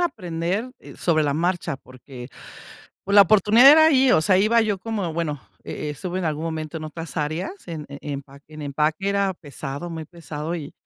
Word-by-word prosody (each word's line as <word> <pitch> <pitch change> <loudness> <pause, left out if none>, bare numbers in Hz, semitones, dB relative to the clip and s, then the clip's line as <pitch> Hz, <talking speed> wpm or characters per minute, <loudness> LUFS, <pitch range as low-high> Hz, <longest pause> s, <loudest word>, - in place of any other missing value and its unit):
aprender 190 - -2 0.3
sobre 155 -3 +1
la 145 -1 0
marcha, 175 -3 -1
porque 130 -1 -12 0.8
por 200 - -1
la 205 - +10
oportunidad 215 +7 +6
era 315 +1 +7
ahí, 265 -4 +4
o - - +5
sea, 185 +3 +3
iba 225 +4 +4
yo 210 -3 0
como, 200 -5 -3
bueno, 155 -4 -3 0.2
e 150 - -5
e - - -2
estuve 175 +5 -5
en 185 - -3
algún 155 0 -2
momento 160 -1 -4
en 155 - -6
otras 165 +1 -8
áreas, 155 - -2 0.2
en 160 -4 -6
en 140 0 -9
empa 140 -1 -7
en 155 -1 -10
empaque 150 +6 -1
era 200 -1 +1
pesado, 145 +1 -7
muy 160 -1 -6
pesado 160 -1 -6
y 155 -4 -6
165 Hz, 195 wpm, -23 LUFS, 150-195 Hz, 0.8 s, la